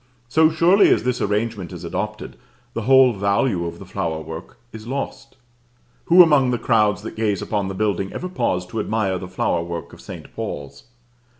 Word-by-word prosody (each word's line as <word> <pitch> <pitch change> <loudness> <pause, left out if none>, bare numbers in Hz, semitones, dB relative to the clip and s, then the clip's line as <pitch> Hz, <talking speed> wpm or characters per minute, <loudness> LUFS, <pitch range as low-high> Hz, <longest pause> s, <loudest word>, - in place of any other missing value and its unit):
So 155 +6 +4
surely 170 +5 +5
as - - +3
this 125 0 -1
arrangement 105 -2 -1
is 90 -1 -8
adopted, 105 +5 -4 0.4
the 115 - -3
whole 130 +1 +5
value 100 -2 0
of 85 - -7
the - - -11
flower 80 -1 -3
work 80 +2 -9 0.2
is 110 0 -9
lost. 135 +1 -5 0.7
Who 180 +2 +8
among 145 -6 +4
the 125 - +1
crowds 105 -3 +2
that - - -7
gaze 105 -4 0
upon 100 -3 -2
the 95 - -5
building 100 -2 -1
ever 180 - -5
pause 90 - -1
to 110 - -4
admire 100 -4 -1
the 90 - -7
flower 90 -2 -1
work 85 0 -6
of - - -13
St. - - -10
Paul's? 70 -1 -6
105 Hz, 185 wpm, -21 LUFS, 95-125 Hz, 0.7 s, Who